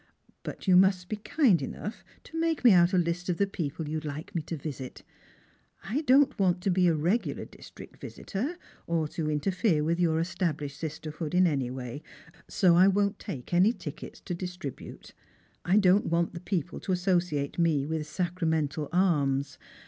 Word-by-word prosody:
But - - -8
you 185 - +6
must 185 -1 +4
be 215 - -2
kind 215 - +2
enough 210 - -6 0.2
to 325 - -6
make 330 -3 0
me 240 - +8
out 175 -1 +5
a 185 - +2
list 175 +1 -1
of 175 - 0
the 200 - +3
people 165 -5 -4
you'd 155 +1 -3
like 150 +6 -6
me 170 - -1
to 160 +2 -5
visit. 135 -3 -7 0.8
I 220 +10 -1
don't 275 -2 +4
want 180 -2 +2
to 195 - +1
be 180 0 +3
a 165 - +3
regular 175 +10 -1
district - - -14
visitor, 265 - -4 0.3
or 165 -2 0
to 155 -1 -3
interfere 165 +2 +1
with 165 +3 0
your 165 -2 +2
established 150 -4 -2
sisterhood 155 +1 -5
in 185 +1 +5
any 140 -7 0
way; 125 +2 -6 0.5
so 180 -3 +3
I 185 +2 +6
won't 200 +1 +1
take 130 +3 -7
any 190 +6 +5
tickets - - -8
to 180 - -5
distribute. 180 -5 -7 0.5
I 185 +3 +3
don't 200 0 +4
Avant 170 0 0
the 170 - -6
people 180 -2 -3
to - - -4
associate 175 -5 0
me 160 -5 +2
with 155 0 -3
sacramental 160 -4 -1
alms. 145 -7 +1
175 Hz, 175 wpm, -28 LUFS, 155-190 Hz, 0.8 s, me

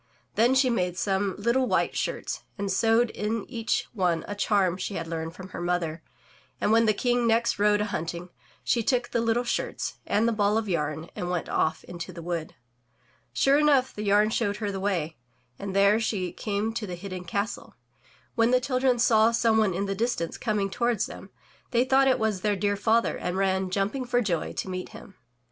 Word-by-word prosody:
Then 240 +4 +3
she 260 -1 +4
made 180 -5 -1
some 195 -1 0
little 235 +5 +1
white - - +1
shirts - - -3 0.2
and 200 -1 -2
sewed 225 +4 +3
in 210 +1 -2
each 230 -3 -1
one 180 -6 0
a 205 - -4
charm 200 -3 +1
she 195 +1 -4
had 165 - -3
learned 165 0 -5
from 190 0 -9
her - - -7
mother, 175 -2 -1 0.6
and - - +1
when 225 0 +4
the 215 - +4
King 245 +1 +1
next 230 -1 +2
rode 210 0 +3
a - - +2
himting, 170 -2 -4 0.3
she 235 - +1
took 245 +1 0
the 235 - 0
little 230 +1 +1
shirts 240 - -3
and 220 +3 +2
the - - +2
ball 210 -1 +2
of 225 -1 -1
yam 155 -2 -2
and 175 - -4
went 180 -2 -2
off 160 - 0
into 175 +1 -7
the 170 -1 -9
wood. 170 -2 -4 0.8
Sure 275 +2 +3
enough, 280 -4 +3
the 210 - -6
yam 205 +2 +4
showed 205 -3 0
her 210 -2 -2
the 195 - -4
way, 175 -5 -1 0.4
and 195 -1 -5
there 200 +2 +5
she 195 -6 -1
came 210 +1 -2
to 225 -2 -4
the 180 - -5
hidden 185 0 -7
castle. 200 +5 -4 0.6
When 230 0 +3
the 255 0 +4
children 255 -1 +1
saw 225 -1 +5
some 230 -1 +2
one 200 -5 +2
in 195 +2 -1
the 195 - -2
distance 205 -5 -1
coming 210 -4 -1
toward 235 -2 0
them, - - -5 0.4
they 245 +1 +2
thought 270 +1 +4
it 260 - +4
was 215 -4 -1
their 210 0 +1
dear 205 +1 0
father 225 +3 +1
and 180 +1 -3
ran, 190 -1 +1
jumping 200 +8 -1
for 245 0 +1
joy, 180 -9 -1
to - - -4
meet 185 -1 -5
him. - - -12
205 Hz, 205 wpm, -26 LUFS, 185-230 Hz, 0.8 s, there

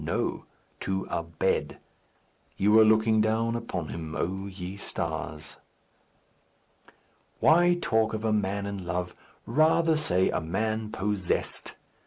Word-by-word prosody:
No. - - -2 0.3
To 95 0 -2
a - - 0
bed. 85 -1 -1 0.8
You 100 +2 +3
were 110 +1 +8
looking 110 0 +4
down 110 +2 +1
upon 95 -9 -4
him, 80 -1 -6
O 95 +2 -2
ye 95 -1 -7
stars. 80 -5 -4 1.8
Why 175 +2 +5
talk 110 -4 +1
of 110 +1 -4
a 110 - +2
man 100 -1 0
in 100 -2 -5
love? 90 0 -3 0.3
Rather 160 +5 +3
say 95 -12 +2
a - - -1
man 110 +6 -2
possessed. 95 -3 -2
100 Hz, 125 wpm, -28 LUFS, 90-110 Hz, 1.8 s, were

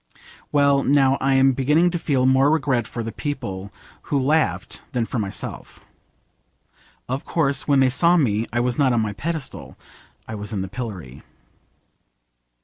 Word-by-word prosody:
Well, 140 -1 +3
now 135 -1 +3
I 135 0 +2
am 135 0 +5
really - - +1
beginning 150 +7 +2
to 175 - -2
feel 135 -5 +1
more 130 +2 +4
regret 135 -7 +1
for 115 - -5
the 115 - -5
people 100 -9 -5 0.4
who 145 - +1
laughed 150 +4 0
than 120 -2 0
for 120 - -3
myself. 100 -2 -6 1.3
Of 130 +3 -3
course 140 -4 0
when 140 -2 +4
they 130 - +4
saw 170 +7 +4
me 115 -7 +1
I 120 +1 0
was 125 +1 -1
not 135 -3 +3
on 115 - +2
my 105 -1 -2
pedestal, 130 - -5 0.5
I - - -6
was 105 0 -5
in 95 -2 -2
the 95 - -6
pillory. 95 - -7
130 Hz, 165 wpm, -22 LUFS, 110-145 Hz, 1.3 s, am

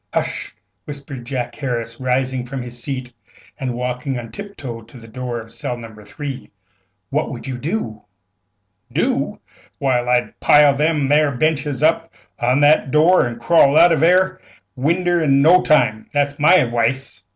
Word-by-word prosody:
"Hush!" - - -3 0.3
whispered 140 -4 -8
Jack 125 -3 -3
Harris, 115 -4 -4
rising 130 0 -1
from 130 0 -5
his 120 0 -9
seat 130 -3 -5 0.5
and 130 -3 -3
walking 125 +2 -3
on 115 -2 -8
tip 200 0 -9
toe 120 -5 -7
to 115 +3 -16
the 115 -1 -13
door 120 +1 -5
of 115 0 -12
cell 120 +1 -4
No. 115 -2 -10
3. 125 +6 -8 0.6
"What - - -1
would - - -8
you 130 -2 -5
do?" 140 - -4 0.9
"Do? - - -1 0.4
Why, 130 -3 +1
I'd 125 0 -1
pile 145 -1 +5
them 150 -1 0
'ere 150 -1 +3
benches 150 -1 -1
up 165 +1 +1 0.3
agin 125 +3 +2
that 150 +2 +6
'ere - - -13
door, 155 +3 +4
an' 120 -1 -6
crawl 140 +3 +4
out 175 - +7
of 160 - +2
that 165 +4 +5
'erc 185 +1 +1 0.3
winder 170 +5 +1
in 140 -3 +3
no 180 +4 +6
time. 110 -8 +1
That's 145 0 -1
my 155 +5 +6
adwice." 120 - 0
135 Hz, 170 wpm, -19 LUFS, 120-150 Hz, 0.9 s, out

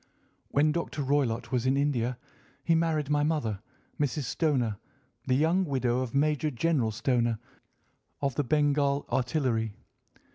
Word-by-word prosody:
"When 150 +2 +3
Dr. 160 -3 -2
Roylott 130 -4 0
was 125 -1 0
in 135 +1 +3
India 130 -4 0 0.5
he 165 - +2
married 160 -3 +1
my 145 0 +3
mother, 145 -10 -1 0.4
Mrs. 145 0 0
Stoner, 125 - 0 0.5
the 130 - +3
young 165 +7 +3
widow 130 -6 0
of 130 -1 -3
Major 150 +1 +2
General 135 -2 +1
Stoner, 120 0 0 0.8
of 140 -2 -1
the 145 - 0
Bengal 145 0 +2
Artillery. 120 -5 0
140 Hz, 135 wpm, -28 LUFS, 120-150 Hz, 0.8 s, When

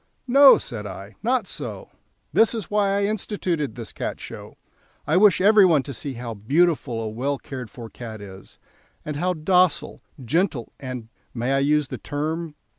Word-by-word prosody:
"No," 275 +2 +8
said 105 -3 -6
I, 100 +1 -9
"not 240 0 +1
so. - - -7 0.4
That 225 +1 +4
is 215 -4 -6
why 205 -1 +2
I 200 - +1
instituted 190 -7 -2
this 115 -3 -8
Cat - - -4
Show; - - -10 0.5
I 155 - +1
wish 195 -1 +6
every 205 +2 +6
one 160 -7 +4
to 140 - -7
see 135 +4 -6
how 120 -1 -6
beautiful 140 - +1
a - - -3
well 130 +6 -2
cared 130 -4 -8
for 115 +2 -9
cat 110 -1 -9
is, 95 -2 -11 0.5
and 150 -1 -4
how 180 +3 0
docile, 175 +1 +2 0.2
gentle, 155 - 0
and 125 -4 -6 0.3
may 120 +3 -1
I 135 - +3
use 145 0 +2
the - - -6
term? 155 +2 -3
150 Hz, 175 wpm, -23 LUFS, 120-185 Hz, 0.5 s, No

